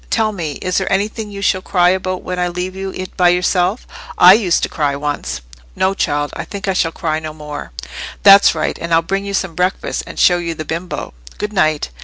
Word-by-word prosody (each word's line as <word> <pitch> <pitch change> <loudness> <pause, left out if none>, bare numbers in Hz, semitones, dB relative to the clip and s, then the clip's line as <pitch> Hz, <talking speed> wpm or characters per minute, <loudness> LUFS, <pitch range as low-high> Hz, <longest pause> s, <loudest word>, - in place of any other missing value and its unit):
Tell 220 -2 +1
me, 165 -7 -4
is 185 +1 +1
there 190 - -3
anything 210 +2 -1
you 200 -1 -7
shall 185 -2 +2
cry 180 -2 +3
about 185 0 -1
when 180 0 -4
I 180 - +1
leave 180 +1 -4
you 190 0 -4 0.3
by 180 -2 +5
yourself? 180 +4 +1 0.3
I 180 +1 +9
used 195 -5 +2
to - - +2
cry 145 -3 -1
once." 140 - -3 0.3
"No, 190 +1 +1
child; 145 -5 -1
I - - -4
think 200 -1 -7
I 190 - +2
shall 165 -3 +1
cry 160 -2 -2
no 155 -1 -6
more." 150 - -8 0.5
"That's 200 0 +8
right; - - -2
and 170 0 +1
I'll 165 - +3
bring 195 +3 -2
you 200 0 -2
some 190 -3 -1
breakfast, 180 +2 -1
and - - -9
show 175 -1 +4
you 170 -1 -3
the 155 - -6
bimbo. 170 +3 -5 0.2
Good 210 0 -4
night." 155 - +1
180 Hz, 220 wpm, -17 LUFS, 160-195 Hz, 0.5 s, I